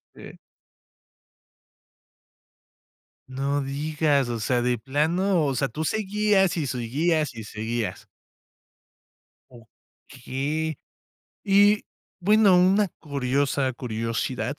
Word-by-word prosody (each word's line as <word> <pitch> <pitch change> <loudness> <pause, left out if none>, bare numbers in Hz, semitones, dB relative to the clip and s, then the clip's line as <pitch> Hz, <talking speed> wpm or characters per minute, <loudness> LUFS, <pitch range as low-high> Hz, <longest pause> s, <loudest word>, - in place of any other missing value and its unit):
Sí. - - -12 2.9
No 140 +2 -1
digas, 145 0 0
o 120 -1 -3
sea, 120 +2 0
de 125 -2 0
plano, 160 - +1
o 135 - 0
sea, 135 +2 0
tú 150 +7 -4
seguías, 205 -1 +1
y 150 - -1
seguías, 140 +5 -1
y 110 - -7
seguías. 110 +2 -4 1.5
Okey. 135 +6 -6 0.7
Y, 205 +1 +4 0.4
bueno, 200 0 +5
una 195 +3 +4
curiosa 140 -1 -1
curiosidad, 115 -2 -3
145 Hz, 85 wpm, -25 LUFS, 125-175 Hz, 2.9 s, bueno